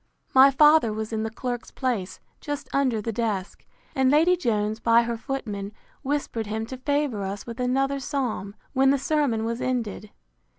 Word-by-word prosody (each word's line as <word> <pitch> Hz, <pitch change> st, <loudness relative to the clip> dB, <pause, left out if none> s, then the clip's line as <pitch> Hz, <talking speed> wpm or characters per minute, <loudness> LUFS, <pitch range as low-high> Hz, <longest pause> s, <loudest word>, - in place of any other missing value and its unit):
My 265 Hz, +1 st, +8 dB
father 295 Hz, -3 st, +5 dB
was 220 Hz, +1 st, -4 dB
in 220 Hz, -, -1 dB
the 220 Hz, -, -2 dB
clerk's 245 Hz, +1 st, -5 dB
place, 205 Hz, -8 st, -3 dB, 0.2 s
just 290 Hz, -1 st, -5 dB
under 255 Hz, -6 st, +1 dB
the 230 Hz, -, -2 dB
desk; 210 Hz, -4 st, -3 dB, 0.3 s
and 265 Hz, -1 st, +3 dB
Lady 325 Hz, +6 st, +5 dB
Jones, 220 Hz, -8 st, -1 dB
by 230 Hz, +1 st, +4 dB
her 235 Hz, 0 st, -2 dB
footman, 210 Hz, -5 st, -5 dB, 0.3 s
whispered 270 Hz, -6 st, -2 dB
him 220 Hz, +1 st, -3 dB
to 260 Hz, +3 st, -7 dB
favour 285 Hz, -4 st, -1 dB
us 195 Hz, +1 st, -5 dB
with 235 Hz, +1 st, -8 dB
another 270 Hz, +2 st, +1 dB
psalm, 250 Hz, -8 st, -3 dB, 0.2 s
when 265 Hz, 0 st, +4 dB
the 280 Hz, -, +4 dB
sermon 275 Hz, -5 st, 0 dB
was 230 Hz, +1 st, -3 dB
ended. 225 Hz, -4 st, -2 dB
240 Hz, 170 wpm, -25 LUFS, 220-275 Hz, 0.3 s, My